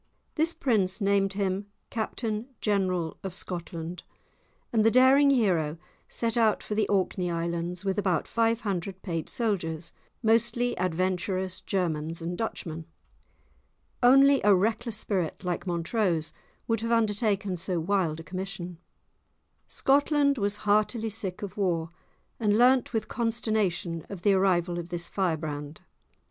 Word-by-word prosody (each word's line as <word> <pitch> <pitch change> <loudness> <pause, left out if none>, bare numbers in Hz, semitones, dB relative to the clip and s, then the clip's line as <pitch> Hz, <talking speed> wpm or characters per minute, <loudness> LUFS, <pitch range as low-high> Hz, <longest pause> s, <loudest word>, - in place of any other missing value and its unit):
This 325 +2 +1
prince 200 -7 +1
named 200 -1 +2
him 195 0 -1 0.2
Captain 220 0 -3
General 185 -5 0
of 190 -2 -5
Scotland, 170 -2 -6 0.7
and 220 -2 +4
the 225 - +6
daring 260 +4 +6
hero 180 - +2 0.3
set 230 -1 -2
out 225 -3 +3
for - - -4
the 215 +1 +1
Orkney 185 -2 0
Islands 170 +2 -3
with 195 +1 0
about 185 -3 0
five 230 0 +1
hundred 190 -2 -3
paid 165 -4 -3
soldiers, 170 -8 -2 0.3
mostly 235 +2 +2
adventurous 185 +1 -1
Germans 165 -4 -2
and 170 +1 -3
Dutchmen. 165 -6 -4 1.2
Only 275 +2 +6
a 205 -1 +6
reckless 220 +3 0
spirit 185 -5 -2
like 180 +1 -3
Montrose 170 -1 0 0.3
would 225 -1 +1
have 230 +1 -2
undertaken 210 -3 +1
so 175 0 -1
wild 170 -3 0
a - - -7
commission. 185 -1 -6 0.9
Scotland 280 0 +2
was 205 0 0
heartily 215 +2 +2
sick 195 -3 -5
of 200 0 -6
war, 170 -5 0 0.5
and 210 -2 +2
learnt 250 +1 +4
with 220 -2 -1
consternation 215 -8 -1
of 190 -3 -8
the 205 - +5
arrival 180 -2 +2
of 170 0 -7
this 175 -1 -4
firebrand. 155 -5 -3
195 Hz, 130 wpm, -28 LUFS, 175-225 Hz, 1.2 s, the